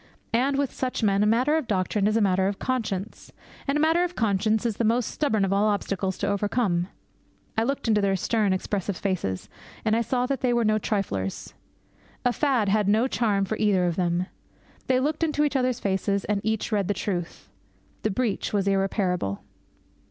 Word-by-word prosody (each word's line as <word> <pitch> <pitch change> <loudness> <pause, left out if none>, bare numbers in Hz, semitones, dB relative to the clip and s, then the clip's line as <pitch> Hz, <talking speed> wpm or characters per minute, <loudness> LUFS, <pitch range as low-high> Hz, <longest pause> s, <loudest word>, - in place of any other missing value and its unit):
And, 270 +4 +2
with 280 -2 0
such 255 -2 -2
men, 200 -1 +3
a 210 - +3
matter 255 +8 +3
of 305 -7 -3
doctrine 195 +1 +1
is 215 +1 +2
a - - +2
matter 190 -1 +2
of 200 0 -2
conscience. 215 -6 -3 0.4
And 275 +1 +1
a - - +1
matter 325 +3 +3
of 355 0 -3
conscience 215 +1 +1
is 225 -3 -1
the - - 0
most 230 +1 +1
stubborn 220 -9 +1
of 195 - 0
all 205 +2 +3
obstacles 195 -2 -1
to - - -2
overcome. 200 -3 0 0.7
I 220 - +2
looked 275 -1 -2
into 215 -2 +3
their 195 -1 +2
stern, 210 +1 +1
expressive 190 0 -2
faces, 165 - -2 0.4
and 220 0 +3
I 230 - +2
saw 245 +2 0
that 275 +1 -2
they 250 -2 +2
were 235 -1 +2
no 215 0 +3
triflers. 100 - -2 0.7
A 245 - +3
fad 260 -8 +1
had 205 0 +2
no 220 +5 +3
charm 210 -6 +1
for 215 +3 -3
either 200 -4 +2
of 175 -2 0
them. 175 0 0 0.6
They 255 -1 +3
looked 300 +4 -1
into 300 -2 +1
each 290 -1 0
other's 255 -2 +1
faces, 200 0 0
and 205 -1 0
each 220 +1 -1
read 200 -3 +1
the 205 - 0
truth. 175 -4 -4 0.5
The 215 - 0
breach 220 0 -1
was 200 -2 0
irreparable. 195 - 0
210 Hz, 195 wpm, -25 LUFS, 195-245 Hz, 0.7 s, men